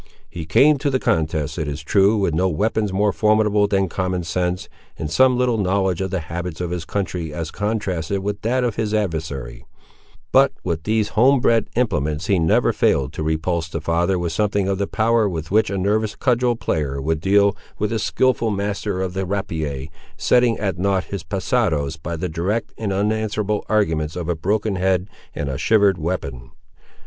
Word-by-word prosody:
He 80 -3 -7
came 145 - +5
to 140 - 0
the 130 - +1
contest, 80 - -1
it 75 - -2
is 75 +1 -5
true, 100 +6 +3
with 95 -5 +1
no 90 +4 +2
weapons 105 +5 0
more 100 +1 +1
formidable 105 +2 +3
than 95 -1 +1
common 90 0 -2
sense, 90 +2 -2 0.3
and 75 -2 -4
some 130 +4 +4
little 125 -3 +1
knowledge 95 -2 +1
of 95 - -1
the 90 -1 -2
habits 85 +1 -5
of 90 -1 -3
his 90 -3 -3
country 90 -4 -3
as 80 +1 -5
contrasted 100 -4 -2
with 100 0 -3
that 125 +3 +1
of 120 -3 -1
his 110 -1 0
adversary; 75 - -3 0.7
but 135 0 +5
with 80 -3 -3
these 110 -1 +1
homebred 120 -1 +3
implements 75 - 0
he 95 0 +2
never 80 -1 +3
failed 70 +1 +1
to - - -5
repulse 80 +1 -1
the 80 - -3
father 85 +4 +1
with 85 -1 -2
something 100 +1 0
of 100 0 -1
the 100 - 0
power 110 -1 +2
with 80 -2 -5
which 110 0 +3
a 100 - -2
nervous 105 +3 0
cudgel 125 -1 +1
player 75 - -2
would 80 +3 -1
deal 100 +1 +3 0.2
with 105 - -1
a 110 - 0
skilful 120 +2 +1
master 100 -1 -2
of 90 -1 -3
the 95 0 -2
rapier, 80 -8 -3 0.3
setting 120 -2 +3
at 95 -4 -2
nought 95 0 +1
his 100 -3 -6
passados 95 - 0
by 80 +2 -5
the 90 +3 -3
direct 90 +8 -2
and 105 -3 -3
unanswerable 105 +1 -1
arguments 80 -8 +1
of 90 -2 -4
a 85 - 0
broken 100 +4 -1
head 95 0 +1 0.3
and 75 - -3
a 70 0 -3
shivered 100 -3 +3
weapon. 75 -7 -4
95 Hz, 185 wpm, -21 LUFS, 80-105 Hz, 0.7 s, came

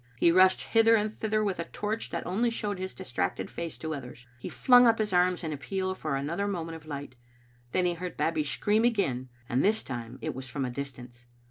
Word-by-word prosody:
He 170 - +5
rushed 185 +1 +5
hither 225 0 +4
and 215 0 0
thither 215 0 0
with 195 -4 -1
a 170 - -2
torch 215 +5 -3
that - - -4
only 220 +7 +1
showed 205 -4 -3
his 185 0 -5
distracted 125 -1 -3
face 170 -2 -5
to 160 -1 -4
others. 125 -3 -8
He - - -6
flung 245 -1 +6
up 230 -1 +4
his 210 -3 -1
arms 180 0 +3
in 160 -2 -2
appeal 185 +7 -2
for 155 -6 -3
an 135 +1 -2
other 175 +6 -1
moment 165 -4 -3
of 160 -1 -12
light; 145 -3 -6 0.6
then 180 - +2
he 175 - +2
heard 175 0 -6
Babbie 160 -1 +1
scream 210 +9 +1
again, 140 - +1 0.2
and 125 +2 +1
this 220 +2 +2
time 120 -1 -6
it - - -3
was 130 0 -7
from 135 +1 -2
a 125 - -3
distance. 125 -2 -8
175 Hz, 225 wpm, -29 LUFS, 140-210 Hz, 0.6 s, flung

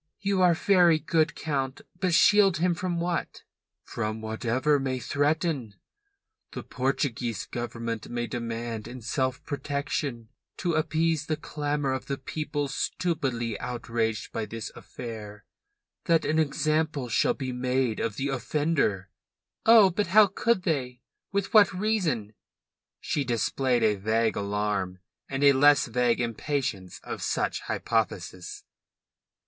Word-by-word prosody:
"You 195 -1 +1
are 175 -2 +5
very 175 -3 +4
good, 160 +1 +1
Count. 135 -4 -2 0.2
But 180 -3 +2
shield 195 -1 +5
him 175 +2 +2
from 175 0 -2
what?" 175 0 -3 0.4
"From 110 -1 -3
whatever 120 +6 0
may 130 -1 -1
threaten. 145 - -1 0.8
The - - -5
Portuguese 125 -4 -2
Government 115 -2 -5
may 120 0 -2
demand 115 -2 -4
in 125 0 -8
self 130 +2 -1
protection, 140 -4 -3 0.3
to 175 -2 -1
appease 160 0 +1
the 155 - -1
clamour 145 -3 -2
of 130 - -5
the 140 - -2
people 145 +1 -3
stupidly 130 - -2
outraged 115 -2 -2
by 110 - -3
this 115 +1 -6
affair, 105 -4 -8 0.6
that 165 -2 +3
an 155 +1 +1
example 155 -2 0
shall 115 - +2
be 130 -2 -4
made 125 -2 0
of 110 -3 -2
the 140 +1 -2
offender." 135 - 0 0.6
"Oh, 220 -4 +8
but 205 +2 -1
how 210 +4 +7
could 200 +1 0
they? 125 -7 -2 0.3
With 200 -1 -2
what 210 -2 +7
reason?" 180 - 0 0.7
She 145 - -1
displayed 125 0 0
a 105 -2 +3
vague 110 +3 +1
alarm, 100 -2 -1 0.3
and 135 +1 -2
a 140 -1 +7
less 145 +2 +5
vague 120 0 +1
impatience 120 -5 -2
of - - -6
such - - -1
hypotheses. 95 -5 -2
135 Hz, 130 wpm, -27 LUFS, 115-160 Hz, 0.8 s, Oh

